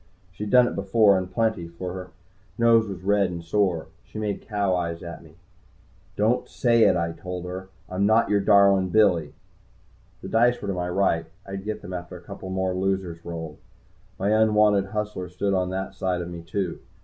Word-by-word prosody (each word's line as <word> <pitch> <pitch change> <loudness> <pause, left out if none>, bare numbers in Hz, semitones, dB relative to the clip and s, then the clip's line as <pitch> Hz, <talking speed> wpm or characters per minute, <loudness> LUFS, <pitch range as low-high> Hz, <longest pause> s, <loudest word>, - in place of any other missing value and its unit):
She'd 105 +3 -6
done 125 +1 +6
it - - -3
before, 100 +1 +4
and 95 -1 -2
plenty, 110 -5 0
for 90 +2 -6
her 90 -1 -7 0.5
nose 115 -1 +4
was 95 -2 -7
red 100 -1 +2
and 85 -1 -6
sore. 90 -1 0 0.2
She - - -12
made 105 -2 -2
cow 100 -3 0
eyes 85 -1 -3
at 85 -1 -8
me. 80 -1 -17 0.8
"Don't 110 +4 +1
say 115 -2 +3
it," - - +4
I 85 0 -1
told 90 +1 -6
her. 95 +1 -6 0.2
"I'm 95 +2 0
not 110 +2 +4
your 100 0 +2
darlin' 100 -2 +4
Billy." 90 -7 +3 0.9
The - - -5
dice 120 +2 +3
were 100 - -5
to - - 0
my 90 -1 -3
right 90 -3 +1 0.2
I'd 95 0 -6
get 110 0 -4
them 90 - -7
after 90 0 -6
a - - -14
couple 95 +1 -9
more 95 0 -1
losers 95 -3 -2
rolled. 80 -3 -7 0.6
My 100 - 0
unwanted 105 -2 +4
hustler 105 -3 -4
stood 100 +3 -1
on 90 -1 +1
that 95 +1 -4
side 95 -2 -1
of 85 - -7
me, 85 -1 -7
too. 90 +1 -3
95 Hz, 195 wpm, -25 LUFS, 90-105 Hz, 0.9 s, done